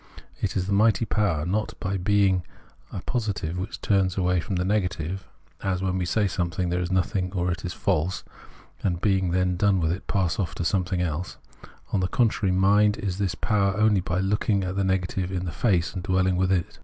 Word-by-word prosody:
It - - -1
is 90 - 0
this 100 - -3
mighty 110 +1 +3
power, 95 -8 0
not 105 +5 -2
by 95 +1 -2
being 95 0 +3 0.5
a 95 - -5
positive 105 -9 -2
which 90 +2 -5
turns 95 -2 +1
away 90 -1 +2
from 95 +3 -3
the 90 0 0
negative, 95 -2 -1 0.3
as 95 -1 -1
when 95 0 0
we 90 - -1
say 105 +3 +2
of 95 - -3
anything 85 0 -1
it 90 - +1
is 90 - -2
nothing 90 0 0
or 90 -2 0
it 90 - -4
is 90 - -3
false, 90 +4 -1 0.6
and, 90 -3 0
being 95 -2 +1
then 90 0 +1
done 100 0 +3
with 80 -1 +1
it, 90 +2 -5
pass 95 -3 0
off 95 - -2
to 85 - -3
something 90 0 0
else; 85 +2 -3 0.6
on 100 - +3
the 90 - +1
contrary, 110 -3 +1
mind 105 +3 +4
is 100 -3 -3
this 95 -3 0
power 100 -3 +1
only 105 -3 +3
by 90 0 -1
looking 100 +1 +1
the 95 +1 -1
negative 95 -1 -1
in 90 -1 -2
the 85 - -3
face, 90 -7 +1
and 90 - -5
dwelhng 95 0 +2
with 95 +1 +1
it. 90 -3 -1
95 Hz, 210 wpm, -25 LUFS, 90-100 Hz, 0.6 s, mind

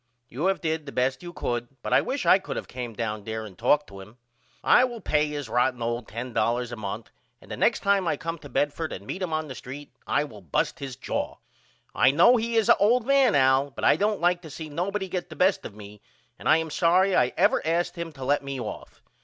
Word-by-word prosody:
You 150 +10 -1
have 195 - 0
did 160 -2 -2
the - - -6
best 130 0 0
you 175 - -8
could 120 -7 -3 0.2
but - - -2
I - - +6
wish 270 0 -3
I 190 - +6
could 190 - -6
of - - -5
came 120 -3 -6
down 110 -2 -3
there 110 +1 -4
and 100 -4 -11
talked 145 +7 +2
to 100 - -11
him. 105 +5 -14 0.5
I - - +6
will 240 -2 -2
pay 150 -6 +1
him 150 - -6
his 145 -3 -4
rotten 125 +2 +1
old 120 0 -3
$10 120 0 -1
a - - -4
month 110 0 -6 0.3
and - - -16
the - - -3
next - - +2
time 200 -2 +2
I - - 0
come 165 -2 -5
to 145 - -11
Bedford 145 +5 -1
and 100 - -8
meet 190 - -5
him 180 -3 -2
on 155 0 -1
the 135 - -6
street 135 +4 -9
I - - +2
will 110 -8 -10
bust 85 -6 -1
his 135 -3 -6
jaw. - - -3 0.6
I - - +5
know 170 - +6
he 230 +1 -2
is 225 -2 +3
a - - +6
old 225 +4 +3
man 275 -3 +4
Al 135 +1 +4
but - - -9
I - - +6
don't 210 0 0
like 175 +1 +2
to 160 - -10
see 155 +2 -7
nobody 190 +6 -2
get 180 -1 -4
the 160 - -9
best 185 +5 +2
of 100 - -16
me 105 -1 -12 0.4
and - - -2
I 155 - +7
am 160 -1 -3
sorry 185 +4 +3
I 125 0 +3
ever - - +3
asked 170 +2 0
him 170 -1 -5
to 135 -3 -7
let 145 +1 +1
me 140 -1 -5
off. 110 -4 -8
145 Hz, 255 wpm, -26 LUFS, 120-180 Hz, 0.6 s, I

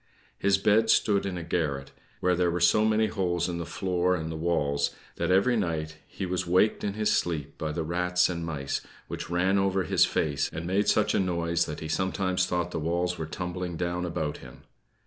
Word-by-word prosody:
His 100 -1 +3
bed 105 +3 +3
stood 100 -3 +3
in 90 -2 -3
a 85 - -5
garret, 75 -5 -2 0.3
where 90 0 +3
there 90 0 +2
were 85 +1 -1
so 90 +5 +4
many 110 0 +3
holes 90 -5 -1
in 85 -1 -3
the 85 - -5
floor 90 -1 0
and 80 -2 -4
the - - -4
walls, 70 -4 0 0.3
that 85 - -1
every 100 +7 +4
night 80 -6 -2
he 95 - -5
was 90 -1 -2
waked 90 +5 +3
in 100 - -1
his 105 0 +1
sleep 80 -5 -1
by 80 -1 -2
the 80 +1 -2
rats 90 +2 +1
and 85 -2 -3
mice, 75 -4 -3 0.3
which - - -6
ran 95 +3 +2
over 95 -1 +1
his 80 - +4
face, 70 -2 0
and 80 +2 -5
made 95 +4 +1
such 110 - +3
a - - +2
noise 85 -2 0
that 75 - -6
he 80 - -4
sometimes 95 +2 0
thought 90 -1 -1
the - - -2
walls 85 +2 -1
were 80 - -3
tumbling 90 0 -4
down 90 +1 -2
about 80 -4 -2
him. - - -13
90 Hz, 210 wpm, -27 LUFS, 80-95 Hz, 0.3 s, so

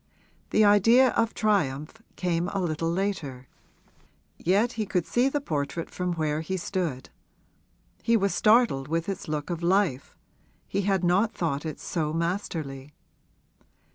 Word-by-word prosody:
The 215 - +4
idea 230 +6 +6
of 230 - +2
the - - -24
triumph 190 -3 0
came 175 -1 -1
a 195 - -2
little 165 -2 -1
later. 170 -9 -3 0.9
Yet 205 +7 +2
he 220 -3 -3
could 180 -3 0
see 250 +3 +2
the 290 - -1
portrait 155 - -3
from 180 -1 -2
where 155 -2 -1
he 190 +4 -3
stood; 175 -7 -3 0.9
he 230 0 +3
was 200 -2 0
startled 215 - +3
with 165 +2 -1
its 195 -2 -4
look 150 +2 -3
of 170 -1 -3
life 175 -6 +1 0.5
he 200 - -1
had 190 -2 +1
not 190 +6 +2
thought 160 -2 -2
it 155 - -6
so 155 -3 -2
masterly. 160 -5 -3
175 Hz, 145 wpm, -26 LUFS, 155-205 Hz, 0.9 s, idea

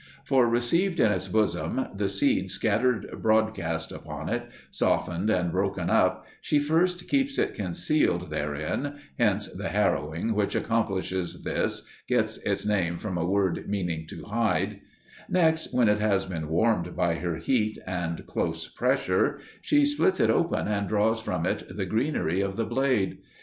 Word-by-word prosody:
For 130 -4 +3
received 170 +11 +1
in 110 - +5
its 95 -1 -2
bosom 110 +6 0
the 100 0 0
seed - - +1
scattered 120 +2 0
broadcast 110 -8 +1
upon - - -6
it, - - -2 0.2
softened 90 +5 0
and 90 -5 +1
broken - - -1
up, - - +2 0.2
she 150 - +1
first 175 +5 +1
keeps 275 0 +1
it - - +1
concealed 90 - 0
therein 75 - -2 0.2
(hence 105 -3 +2
the 95 0 -5
harrowing 85 0 0
which 105 -1 0
accomplishes 95 -5 -1
this - - -1 0.2
gets - - +1
its - - -2
name 90 -5 +1
from 95 -2 -4
a 85 - 0
word 95 -2 0
meaning 85 -6 -2
"to - - -9
hide"); 105 -2 0 0.5
next, 160 -3 +2
when 125 -2 +3
it 105 0 +3
has 100 -2 +2
been 80 -4 -5
warmed 90 0 +1
by 85 -1 +2
her 85 -1 -2
heat 110 +5 0
and 90 -3 -3
close - - -2
pressure, - - +1 0.2
she 290 -1 +3
splits 240 -10 +2
it - - +4
open 170 - +1
and 100 -1 -1
draws 110 +1 +1
from - - -2
it 90 - -3
the 95 - -1
greenery 110 - 0
of 100 -1 -2
the 115 - -1
blade. 120 -4 0
105 Hz, 155 wpm, -27 LUFS, 90-120 Hz, 0.5 s, in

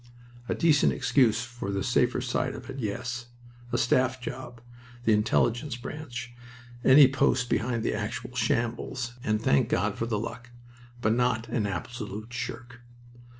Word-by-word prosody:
A - - +1
decent 155 -4 +4
excuse 115 -4 +3
for 120 -4 -6
the 100 0 -1
safer 125 0 +2
side 125 -1 -1
of 130 +1 -8
it 135 - -7
yes. 120 +2 -3 0.4
A - - +1
staff 130 +1 +2
job, 125 -1 -7 0.5
the 110 - +5
Intelligence 120 +5 +1
branch, 125 -2 -7 0.5
any 135 +1 +8
post 130 -2 +1
behind 115 -1 0
the - - 0
actual 115 +4 -4
shambles 120 +1 -1
and 110 -4 +1
thank 70 -10 +2
God - - 0
for 115 - -1
the 110 -3 0
luck. 115 +2 -6 0.5
But 110 - +3
not 120 -2 +1
an 110 -3 0
absolute 110 +3 -5
shirk. 125 0 -6
120 Hz, 150 wpm, -28 LUFS, 110-125 Hz, 0.5 s, any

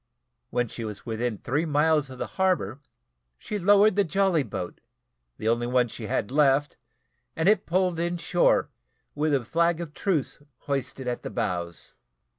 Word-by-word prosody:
When 120 -1 0
she 115 - -7
was 105 -2 -7
within 115 -1 -2
three 145 +9 -1
miles 150 -1 +2
of 130 - -9
the - - -3 0.2
harbour, 160 - +1 0.6
she 210 - -4
lowered 205 +2 +5
the 205 - +4
jolly 190 -2 +2
boat, 90 -9 -6 0.6
the 110 - -4
only 120 +1 +1
one 125 -1 +2
she 110 0 -7
had 100 +3 -1
left, 145 0 +3 0.6
and 160 +2 0
it 210 +1 +3
pulled 180 -1 +1
in 175 +1 -1
shore 175 +1 +2 0.4
with 150 +1 0
a 135 -4 +1
flag 170 +4 +1
of 165 -3 -6
truce 165 -7 -1 0.2
hoisted 135 -2 -3
at 125 - -2
the - - -5
bows. 85 -2 -3
145 Hz, 165 wpm, -26 LUFS, 120-175 Hz, 0.6 s, lowered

